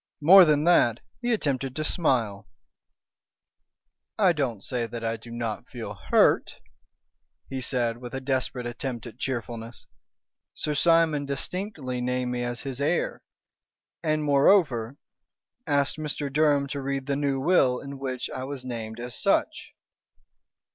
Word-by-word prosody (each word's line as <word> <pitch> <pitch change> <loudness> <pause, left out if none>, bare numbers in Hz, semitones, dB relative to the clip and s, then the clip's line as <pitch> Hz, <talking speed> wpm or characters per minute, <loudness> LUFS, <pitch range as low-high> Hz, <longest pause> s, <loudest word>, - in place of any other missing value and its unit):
More 185 +5 +9
than 150 -2 +3
that, 140 -9 +4 0.2
he 240 0 0
attempted 135 - -1
to 155 - -2
smile. 115 - 0 1.7
"I 190 -5 +4
don't 125 - -2
say 120 -3 -2
that 115 0 -7
I 115 0 0
do 115 +1 -12
not 115 0 -4
feel 115 -5 -6
hurt," 85 -5 +2 0.9
he 135 -1 -3
said, 120 -3 0
with 120 +1 -8
a - - -2
desperate 130 -2 -2
attempt 120 -1 -5
at 120 +1 -11
cheerfulness. 115 -2 -5 0.7
"Sir 150 - -2
Simon 160 -2 +3
distinctly 140 -3 -4
named 125 0 -1
me 125 0 -2
as 120 -1 -3
his 135 -1 -5
heir, 160 +4 0 0.8
and, 155 -2 0
moreover, 140 - +3 0.7
asked 140 -1 +1
Mr. 145 -2 -4
Durham 145 -2 +3
to 140 0 -4
read 135 0 -3
the 140 0 -1
new 140 -1 0
will 135 -5 +3
in 140 0 -8
which 130 -2 -3
I 130 - -5
was 135 -1 -6
named 115 -2 -5
as 120 0 -6
such." - - 0
135 Hz, 140 wpm, -26 LUFS, 120-145 Hz, 1.7 s, More